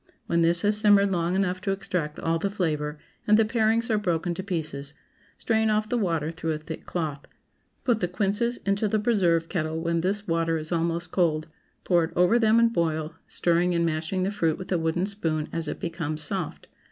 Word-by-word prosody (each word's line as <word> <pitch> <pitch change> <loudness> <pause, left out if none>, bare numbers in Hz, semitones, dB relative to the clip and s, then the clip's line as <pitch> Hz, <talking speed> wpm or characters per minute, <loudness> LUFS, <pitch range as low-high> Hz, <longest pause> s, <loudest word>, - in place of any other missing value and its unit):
When 170 0 +1
this 170 +2 +3
has 210 0 +3
simmered 205 -2 +5
long 175 0 0
enough 185 -1 0
to 195 - -3
extract 185 -6 -2
all 165 0 0
the 200 - -1
flavor, 155 -6 -2 0.3
and 215 0 +6
the 225 - +4
parings 225 0 +1
are 215 - +2
broken 175 -3 -1
to 170 - -4
pieces, 155 -6 -4 0.4
strain 220 -1 +1
off 215 0 +1
the - - 0
water 165 -8 0
through 165 -1 -3
a - - -2
thick 155 +1 -8
cloth. 155 -5 -3 0.6
Put 240 -4 +2
the 180 - 0
quinces 205 +6 0
into 200 +2 +1
the 215 - +1
preserve 185 -7 +2
kettle 160 -3 -2
when 170 0 0
this 200 +4 -1
water 165 -1 +1
is 155 +1 -4
almost 170 +1 -1
cold, 160 -3 +1 0.3
pour 175 -2 +3
it 160 - -10
over 180 +7 +4
them 220 -1 +4
and 230 0 +4
boil, 160 -2 -1
stirring 175 +1 +1
and 170 0 +2
mashing 165 +3 -1
the 195 - 0
fruit 165 -6 0
with 185 0 -8
a 180 - +2
wooden 165 +3 0
spoon 165 -7 -2
as 165 -1 -2
it - - -4
becomes 160 -3 -3
soft. 180 +1 -3
175 Hz, 205 wpm, -26 LUFS, 165-200 Hz, 0.6 s, and